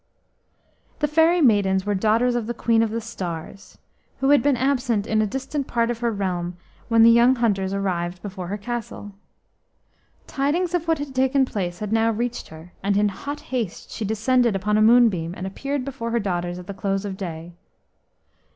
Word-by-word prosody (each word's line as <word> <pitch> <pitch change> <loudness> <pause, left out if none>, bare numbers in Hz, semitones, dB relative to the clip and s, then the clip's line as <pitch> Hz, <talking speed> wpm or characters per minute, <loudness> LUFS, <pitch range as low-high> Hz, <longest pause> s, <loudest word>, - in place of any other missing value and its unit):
The 295 - 0
fairy 325 +3 +3
maidens 200 -7 +3
were 205 - 0
daughters 220 +5 +2
of 240 -2 -2
the 240 - -3
Queen 230 -1 +2
of 225 - +1
the 225 +2 -2
Stars, 190 -4 -7 0.4
who 270 - +1
had 290 0 +6
been 285 -3 +2
absent 245 -5 0
in 220 0 +1
a 215 - +1
distant 270 +4 -4
part 235 0 0
of 235 - -5
her 235 -1 0
realm 180 -4 -3 0.3
when 230 -1 +5
the 230 - +8
young 240 +3 +5
hunters 200 -6 0
arrived 180 -3 -2
before 190 -3 -6
her 200 +3 -3
castle. 220 -1 -6 1.1
Tidings 320 +6 -1
of 340 -2 -1
what 325 -1 +2
had 285 -2 -6
taken 265 +1 +2
place 180 -7 -4
had 210 +2 -4
now 225 0 +3
reached 240 +2 -3
her, 160 +3 -13
and 200 +1 +1
in 210 0 +3
hot 285 +9 -6
haste 230 -8 -3
she - - -5
descended 230 +2 +2
upon 210 +2 0
a 215 - +3
moonbeam 215 -7 +4
and 185 - -5
appeared 275 +7 -3
before 260 -4 -5
her 235 0 +1
daughters 175 -3 -2
at 180 - -9
the 200 - -6
close 195 +1 -2
of 195 -2 -4
day. 170 -3 -7
220 Hz, 190 wpm, -23 LUFS, 195-250 Hz, 1.1 s, the